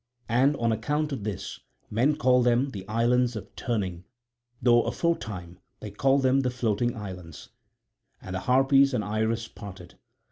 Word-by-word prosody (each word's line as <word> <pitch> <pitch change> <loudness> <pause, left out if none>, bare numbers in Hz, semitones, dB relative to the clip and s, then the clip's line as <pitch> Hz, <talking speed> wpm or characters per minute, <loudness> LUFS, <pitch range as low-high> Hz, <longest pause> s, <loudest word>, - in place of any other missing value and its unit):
And 130 +5 +3
on 115 -3 0
account 150 +7 -1
of 130 -7 -4
this 105 -4 -5 0.3
men 125 +8 +2
call 125 -2 +3
them 125 +3 +2
the 95 -4 -8
Islands 120 +2 +2
of 110 - -8
Turning 95 -7 -3 0.6
though 120 -1 +5
aforetime 100 - -3 0.2
they 105 - -7
called 135 +6 +2
them 130 +1 +4
the 130 -2 +1
Floating 120 -1 -1
Islands. 90 -7 -8 0.7
And 95 - -8
the 95 - -2
Harpies 135 +3 +4
and 110 - 0
Iris 110 +2 -1
parted. 95 -6 -11
115 Hz, 150 wpm, -27 LUFS, 105-130 Hz, 0.7 s, though